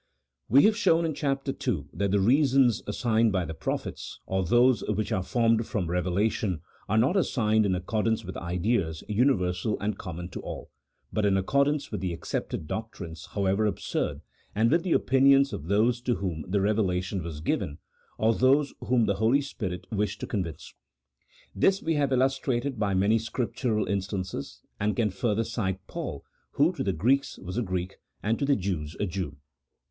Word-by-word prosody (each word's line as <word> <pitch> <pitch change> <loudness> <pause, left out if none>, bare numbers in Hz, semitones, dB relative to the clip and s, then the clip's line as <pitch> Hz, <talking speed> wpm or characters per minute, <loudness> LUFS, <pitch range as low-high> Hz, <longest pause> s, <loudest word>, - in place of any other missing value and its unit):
We 135 +5 +7
have 215 0 +5
shown 170 -7 +3
in 160 - -1
Chap. 140 -1 -2
II. 135 - -2
that 100 0 0
the 100 +1 +2
reasons 130 +1 +4
as 105 - -3
signed 115 -2 +3
by 95 -3 0
the 80 - -5
prophets, - - -4
or 95 0 0
those 120 +3 +4
which 105 0 -1
are 95 - +1
formed 115 +2 +1
from 90 -8 -2
reve 90 -1 0
lation, 95 -2 0 0.3
are 110 - +2
not 130 - +3
assigned 110 - +2
in 95 - +1
accordance 110 +4 -1
with 95 - -7
ideas 85 -1 -1
universal 105 -4 +1
and 105 +1 -2
common 90 -2 -6
to - - -7
all, - - -7 0.4
but 110 - 0
in 100 -1 +3
accordance 140 +8 +1
with 105 -5 -3
the 90 -2 -2
accepted - - -3
CHAP. - - -17
VI.] - - 0
OF - - -1
MIRACLES. 110 0 -12
89 80 - -7
doctrines, 80 - -10
however 100 +1 +2
absurd, 105 - -2 0.3
and 110 +2 +3
with 165 +2 +4
the 180 -2 0
opinions 135 +1 +4
of 75 - -5
those 115 +5 +2
to 120 -1 0
whom 90 -5 -3
the 100 +2 +1
revelation 95 -2 0
was 80 -3 -6
given, 75 -1 -2 0.4
or 110 +1 +3
those 140 +4 +3
whom 120 -3 +2
the 100 -2 0
Holy 115 +7 +3
Spirit 95 -10 -5
wished 105 0 -1
to - - -2
convince. 85 -8 -4 0.8
This 190 - +2
we 165 - +1
have 145 -3 +1
illustrated 130 -1 0
by 100 -3 +1
many 100 +4 +3
Scriptural 115 0 -1
instances, 95 -5 -3 0.2
and 105 +1 0
can 110 -4 +1
further 115 +2 0
cite 95 -4 -3
Paul, - - -5 0.3
who - - +3
to - - -3
the 95 - +1
Greeks 125 +11 +1
was 90 0 -7
a - - +1
Greek, 95 -3 -3 0.3
and 110 +2 0
to 140 - +1
the 140 0 +3
Jews 85 - -3
a - - +1
Jew. 90 -6 -4
105 Hz, 190 wpm, -27 LUFS, 95-125 Hz, 0.8 s, We